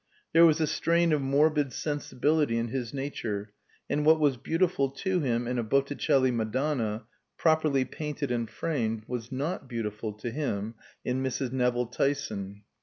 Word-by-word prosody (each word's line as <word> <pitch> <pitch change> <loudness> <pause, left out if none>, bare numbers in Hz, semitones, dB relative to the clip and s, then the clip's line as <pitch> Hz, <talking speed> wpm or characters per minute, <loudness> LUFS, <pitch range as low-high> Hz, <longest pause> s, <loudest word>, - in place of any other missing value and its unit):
There 165 0 +8
was 160 0 +3
a 160 - +3
strain 170 +2 +2
of 150 - +2
morbid 145 +1 +2
sensibility 145 -1 0
in 115 0 -1
his 120 -2 -3
nature, 110 -7 -4 0.3
and 150 - 0
what 160 +1 +6
was 145 -3 +3
beautiful 165 +1 +1
to 185 +7 -1
him 120 -5 0
in 125 0 -1
a - - 0
Botticelli 135 +1 +2
Madonna, 115 -1 -1 0.3
properly 155 -5 +3
painted 150 -3 -4
and 115 -2 -1
framed, 115 -9 -2
was 120 -2 -5
not 140 +1 -3
beautiful 110 -2 -3
to 105 +3 -5
him 115 -6 -2 0.3
in 125 +1 0
Mrs. 130 -1 -2
Nevill 125 -1 +1
Tyson. 110 -6 -2
135 Hz, 155 wpm, -28 LUFS, 115-150 Hz, 0.3 s, There